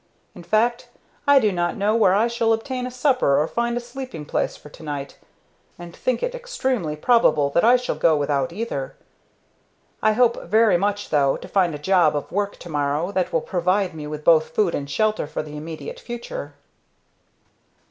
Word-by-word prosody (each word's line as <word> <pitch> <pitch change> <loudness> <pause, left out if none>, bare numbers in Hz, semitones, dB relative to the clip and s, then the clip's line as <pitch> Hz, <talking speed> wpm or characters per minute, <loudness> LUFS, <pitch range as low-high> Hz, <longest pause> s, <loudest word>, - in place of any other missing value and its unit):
In 180 - -11
fact, 230 +6 0 0.4
I 285 0 +7
do 220 -6 +3
not 175 -1 -1
know 205 +2 +1
where 195 -5 +4
I 220 +3 +3
shall 230 -1 +1
obtain 250 +2 -3
a - - -5
supper 255 - +2
or 155 - +1
find 235 +3 -1
a - - 0
sleeping 245 - -8
place - - -1
for - - -14
to - - -15
night, 145 -3 -5 0.6
and 175 -1 -10
think 255 -2 -1
it - - -1
extremely 265 - -2
probable 155 - +3
that 170 - +2
I 240 +2 +6
shall 250 0 -1
go 160 -2 +3
without 145 0 0
either. 175 -9 -4 1.1
I 215 0 +3
hope 235 +1 +2
very 220 -2 +4
much, 205 +3 -1
though, 140 -2 +2
to - - -10
find 180 -5 +1
a - - -4
job 165 -1 +3
of 145 - -4
work 200 +1 -2
to 175 - -9
morrow 150 +4 -1
that 185 -2 -1
will 165 -2 +1
provide 185 +2 0
me 150 -2 -7
with 150 0 -6
both 155 -1 +4
food 200 -5 +2
and 140 -1 -4
shelter 215 +2 0
for 155 - -4
the 150 -1 -9
immediate 160 - -7
future." 255 - -7
190 Hz, 190 wpm, -22 LUFS, 155-235 Hz, 1.1 s, I